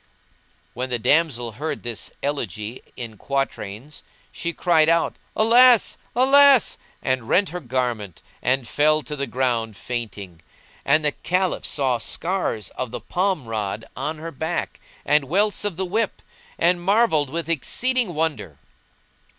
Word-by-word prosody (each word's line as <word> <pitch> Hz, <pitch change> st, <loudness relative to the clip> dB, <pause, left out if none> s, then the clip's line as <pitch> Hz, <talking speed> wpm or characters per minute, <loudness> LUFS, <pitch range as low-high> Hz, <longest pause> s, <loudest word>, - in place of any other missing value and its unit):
When 130 Hz, +1 st, -4 dB
the 125 Hz, -, 0 dB
damsel 125 Hz, -2 st, +2 dB
heard 150 Hz, +9 st, -5 dB
this 120 Hz, -2 st, -4 dB
elegy 115 Hz, -5 st, -3 dB, 0.2 s
in 115 Hz, -3 st, -7 dB
quatrains 135 Hz, -1 st, -4 dB, 0.3 s
she 170 Hz, -, -3 dB
cried 165 Hz, -2 st, +3 dB
out 170 Hz, 0 st, +2 dB, 0.2 s
"Alas! 240 Hz, +1 st, +6 dB, 0.2 s
Alas!" 270 Hz, 0 st, +6 dB, 0.2 s
and 130 Hz, -3 st, -1 dB
rent 200 Hz, +1 st, +3 dB
her 180 Hz, -, -5 dB
raiment, 120 Hz, -, -3 dB, 0.2 s
and 130 Hz, -1 st, 0 dB
fell 155 Hz, +4 st, +2 dB
to 150 Hz, +4 st, -6 dB
the 140 Hz, -1 st, -3 dB
ground 115 Hz, -4 st, -1 dB
fainting; 100 Hz, -8 st, -6 dB, 0.4 s
and 150 Hz, +2 st, +3 dB
the 150 Hz, -, +3 dB
Caliph 180 Hz, +5 st, -1 dB
saw 130 Hz, -4 st, +1 dB
scars 165 Hz, -, -2 dB
of 130 Hz, -1 st, -4 dB
the -, -, -5 dB
palm 185 Hz, -6 st, -1 dB
rod[FN#179] 110 Hz, -1 st, -3 dB
on 155 Hz, +1 st, -3 dB
her 165 Hz, +2 st, -7 dB
back 160 Hz, +4 st, -3 dB, 0.3 s
and 150 Hz, -1 st, +3 dB
welts 200 Hz, +8 st, +1 dB
of 205 Hz, -5 st, -2 dB
the 190 Hz, -, -1 dB
whip; 210 Hz, +4 st, -2 dB, 0.3 s
and 175 Hz, +1 st, +2 dB
marvelled 195 Hz, -, +3 dB
with 165 Hz, +3 st, -4 dB
exceeding 225 Hz, -, 0 dB
wonder. 150 Hz, -, -2 dB
150 Hz, 140 wpm, -23 LUFS, 120-180 Hz, 0.4 s, Alas